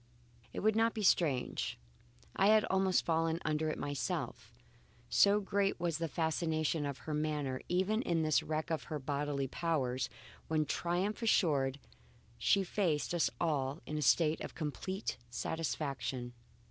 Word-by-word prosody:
It - - -4
would 215 +1 +3
not 225 +1 +2
be 215 - -2
strange; 150 -9 +1 0.6
I 195 - +4
had 215 0 +6
almost 190 -1 +2
fallen 165 0 +1
under 155 0 0
it - - -3
myself, 145 -2 -3 0.6
so 205 +1 +5
great 200 -1 0
was 170 -2 -1
the 165 - -1
fascination 160 -1 0
of 140 -2 -4
her 155 - -3
manner 150 -4 -1
even 190 +5 +1
in 170 -7 0
this 155 -5 +3
wreck 155 +2 -3
of 160 - -1
her 155 - -3
bodily 140 0 -2
powers, 130 -5 -1 0.4
when 155 -1 +1
triumph 180 +8 -1
assured, 145 - +2 0.6
she 195 - +3
faced 175 -5 0
us 170 -8 +2
all 145 -3 0
in 155 - -5
a 150 - -1
state 155 +3 +3
of - - -6
complete 185 +6 -3
satisfaction. 135 -3 -3
160 Hz, 145 wpm, -34 LUFS, 145-180 Hz, 0.6 s, had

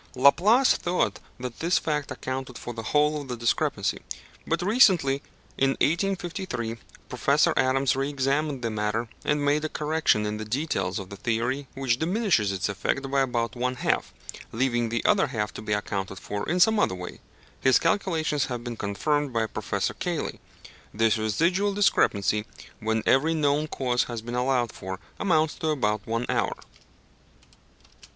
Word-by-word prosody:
Laplace 190 - +5
thought 180 +1 0 0.2
that 125 -1 -6
this 170 +3 +2
fact 150 -2 -1
accounted 130 0 -5
for 120 - -6
the 115 - -5
whole 150 +5 +2
of 140 - -9
the 125 -1 -4
discrepancy; 115 0 0 0.5
but 165 +1 0
recently, 180 - +4 0.4
in 135 - +4
1853, 175 - -1 0.3
Professor - - +2
Adams 130 0 +2
re 135 +1 -1
examined 140 0 -1
the 115 - -1
matter, 110 +2 -1 0.2
and 150 -1 +1
made 145 +2 +2
a 155 - -1
correction 150 -9 +1
in 105 0 -2
the 110 - -5
details 110 - -1
of 95 -2 -6
the - - -6
theory 120 +6 -1
which 130 -3 0
diminishes 175 - +1
its 95 0 -1
effect 135 +7 -2
by 140 0 +3
about 120 -3 -1
one 125 +1 -1
half, - - 0 0.4
leaving 120 -1 0
the 115 +1 -2
other 205 -2 +4
half 105 -2 -3
to - - -7
be 105 - -5
accounted 100 -2 -2
for 100 +1 -4
in 175 +3 +1
some 220 +3 +5
other 95 - +2
way. 90 -1 -8 0.4
His 130 - +5
calculations 160 -5 +1
have 120 -2 -4
been 120 -1 -5
confirmed 145 +9 -1
by 115 -2 +1
Professor - - -2
Cayley. - - -3 0.5
This 110 +1 +2
residual 175 - +1
discrepancy, 105 - +2 0.3
when 110 0 -1
every 155 +5 +3
known 150 0 +1
cause 125 -4 0
has 115 -2 -6
been 120 +1 -6
allowed 125 -1 +1
for, 95 0 -7 0.2
amounts 160 -5 +2
to 160 - -2
about 110 -8 0
one 115 +2 -1
hour. - - 0
130 Hz, 160 wpm, -26 LUFS, 115-155 Hz, 0.5 s, Laplace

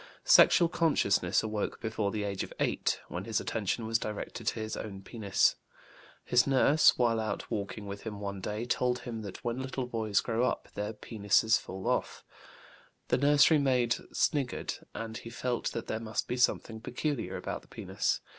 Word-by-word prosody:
Sexual 180 - +7
consciousness 100 - +2
awoke 110 -1 -3
before 110 -2 -1
the 105 0 -2
age 100 -2 -2
of - - -8
8, - - 0
when - - -5
his - - 0
attention 115 - -2
was 115 +1 +1
directed 105 -1 -5
to - - 0
his 110 0 -3
own 95 -3 -7
penis. 105 -4 +1 0.7
His 125 +2 +4
nurse, 140 +3 +5
while 115 -2 +2
out 110 0 -4
walking 105 -1 -4
with 100 0 -6
him 105 -2 -6
one 100 -1 -5
day, 105 +4 -3
told 125 +1 0
him 115 -3 -5
that 100 -3 -8
when 120 +2 -2
little 130 -1 -3
boys 110 -4 0
grow' 115 0 0
up 125 - -2
their 105 +1 -3
penes 105 0 +2
fall 95 -2 -8
off. - - -1 0.9
The - - +2
nursery 145 +2 +5
maid 125 -4 +2 0.2
sniggered, 140 -4 0 0.2
and 115 0 -5
he 115 - -8
felt 120 +1 -2
that 115 - -4
there 110 - -3
must 110 -1 -3
be 125 - -2
something 115 -2 +1
peculiar 130 +1 -3
about - - -5
the - - -22
penis. - - -2
115 Hz, 175 wpm, -30 LUFS, 105-125 Hz, 0.9 s, Sexual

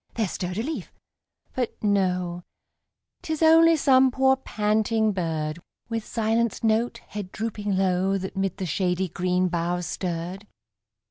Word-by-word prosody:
there 220 -3 0
stirred 180 +1 -4
a 220 - -1
leaf, 310 +4 -5 0.6
but 250 -3 -2
no, 180 -4 +1 0.8
Tis 315 0 -2
only 330 +1 +7
some 265 -3 +5
poor, 265 +1 +3
panting 220 -2 0
bird, 160 -4 -2 0.3
With 225 -1 -2
silenced 230 0 0
note, 225 +2 +1
head 200 -3 -6
drooping 210 -3 -2
low, 190 +1 +1
That 190 +1 -6
'mid 195 -1 -1
the 190 - -3
shady 180 +2 0
green 180 +2 0
boughs 175 0 -1
stirred. 180 +4 -4
200 Hz, 135 wpm, -25 LUFS, 180-230 Hz, 0.8 s, only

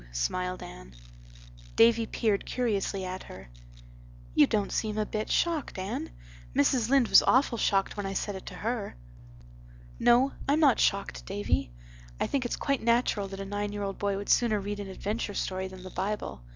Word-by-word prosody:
smiled 180 - -2
Anne. - - -11 0.8
Davy 230 0 +5
peered 215 -4 0
curiously 200 -5 -1
at 185 +1 -5
her. - - -11 0.8
"You - - +6
don't 205 -2 0
seem 215 -1 -1
a 215 - +1
bit 215 +1 -3
shocked, 330 - 0
Anne. 190 +1 -4 0.5
Mrs. 230 - +2
Lynde 270 -3 +4
was - - +9
awful 255 -2 +3
shocked 195 -1 +1
when 205 -1 -3
I 195 - -3
said 200 +1 -2
it 190 - -9
to - - -7
her." 225 -1 -3 1.0
"No, 250 +3 +5 0.2
I'm 290 +2 +3
not 285 -6 +5
shocked, 200 0 0
Davy. 200 - -1 0.5
I - - +1
think 270 -3 -1
it's 240 - -1
quite 275 -2 -1
natural 235 -3 +2
that 195 0 -8
a - - -5
nine 205 +1 -3
year 205 0 -3
old 195 -1 -4
boy 200 -1 0
would 200 - -6
sooner 220 -4 +3
read 205 +1 -4
an 200 - -5
adventure 205 +2 -3
story 190 0 -2
than 185 -1 -11
the 185 - -9
Bible. 195 - -3
205 Hz, 180 wpm, -29 LUFS, 195-235 Hz, 1.0 s, was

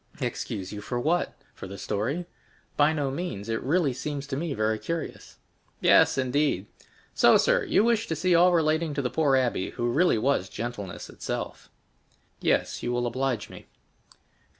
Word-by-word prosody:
"Excuse 95 0 -4
you 105 - -6
for 120 +4 -3
what? 165 +7 0 0.2
For - - -9
the 100 +1 -8
story? 120 - -2 0.5
By 150 +1 +4
no 145 -4 -1
means; 135 - -5
it 115 - -1
really 145 -1 +1
seems 140 +2 -4
to 140 -1 -4
me 155 0 -2
very 110 0 0
curious." 165 +5 -5 0.4
"Yes, - - +5
indeed. 130 -6 +1 0.5
So, - - +6
sir, - - +2
you - - +3
wish 230 -1 +2
to 160 - -1
see 180 +3 +1
all 175 +2 +6
relating 160 -2 +1
to 140 - -1
the 125 - -1
poor 145 -4 +3
abbé, 120 -7 -1
who 120 0 -1
really 170 0 +3
was 110 -5 +1
gentleness 105 -6 -6
itself." - - -6 0.7
"Yes, - - 0
you 120 - -2
will 120 0 0
much 120 - 0
oblige 130 -3 -2
me." - - -12
135 Hz, 175 wpm, -27 LUFS, 115-160 Hz, 0.7 s, So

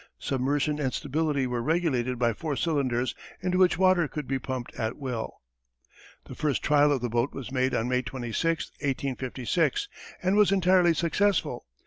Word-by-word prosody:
Submersion 145 +3 0
and 135 -3 0
stability 145 0 -1
were 125 -1 -2
regulated 130 -5 0
by 120 -1 +2
four 150 +5 -3
cylinders 130 -6 0 0.3
into 180 0 0
which 185 -1 +4
water 185 -3 +4
could 150 -1 -6
be 135 0 -1
pumped 130 -1 -5
at 110 +1 -3
will. 125 -5 -5 0.8
The - - -9
first 150 -3 -1
trial 150 0 +4
of 135 -4 +1
the 120 - -1
boat 120 +4 0
was 130 -2 -6
made 130 -1 +1
on 115 - 0
May 125 0 +1
26, 135 +7 -2
1856, 135 - -1 0.4
and 185 +2 +2
was 210 -2 +5
entirely 180 -3 +4
successful. 170 - 0
140 Hz, 160 wpm, -27 LUFS, 125-165 Hz, 0.8 s, was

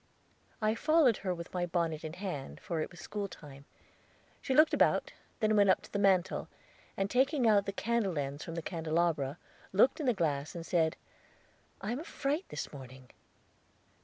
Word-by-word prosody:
I 215 0 +3
followed 295 -1 +4
her 190 - -2
with 170 -1 -6
my 175 -1 -1
bonnet 165 -3 -1
in 155 0 -5
hand, 180 -7 -5
for 165 -3 -3
it - - -3
was 175 - -14
school 205 +2 -4
time. 140 -6 -12 0.8
She 265 - -1
looked 310 +2 +6
about, - - +3 0.3
then 215 0 +3
went 200 -1 +5
up 185 - +3
to - - -14
the 200 - 0
mantel, 190 -3 +2 0.5
and 195 - +1
taking 265 +3 +2
out 205 -2 +4
the - - 0
candle 205 -4 -1
ends 140 +1 -3
from 165 - -6
the 165 - -4
candelabra, 160 -4 0 0.3
looked 215 - +4
in 295 - -2
the 245 - +3
glass, 150 -5 -1
and 165 -1 -6
said, 165 -3 +1 0.8
"I 200 +3 -3
am 245 - -2
a - - -6
fright 300 +2 -2
this 150 - -5
morning." 130 -2 -11
180 Hz, 185 wpm, -32 LUFS, 160-215 Hz, 0.8 s, looked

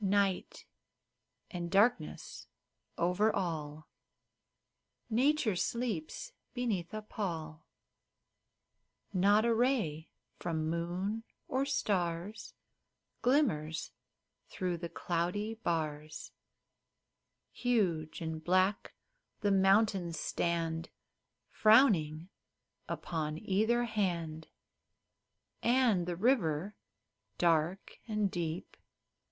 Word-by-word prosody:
Night 195 -1 +1 0.9
and 175 -2 -4
darkness 215 +7 +1 0.5
over 180 +6 +2
all! 155 -5 -3 1.2
Nature 255 -2 +3
sleeps 210 -5 -2 0.2
beneath 215 -9 -1
a 215 0 -5
pall; 165 -7 -5 1.5
Not 205 +4 +4
a 235 - +3
ray 220 - +1 0.3
from 160 -2 -2
moon 180 +6 -2 0.2
or 265 +1 0
stars 185 -6 -1 0.7
Glimmers 215 - +1 0.6
through 180 -2 -2
the 170 0 -5
cloudy 180 +7 -1
bars; 155 -7 -3 1.2
Huge 180 -11 0
and 160 -1 -4
black 185 +3 +2 0.5
the 205 - +2
mountains 195 -3 +3
stand 165 -1 -1 0.6
Frowning 190 - +4 0.6
upon 155 -2 -3
either 220 +7 +1
hand, 170 -8 -2 1.1
And 235 -8 +3
the 175 - -1
river, 195 - +1 0.6
dark 170 +2 +1
and 210 -3 0
deep. 170 0 -4
185 Hz, 80 wpm, -33 LUFS, 165-215 Hz, 1.5 s, Not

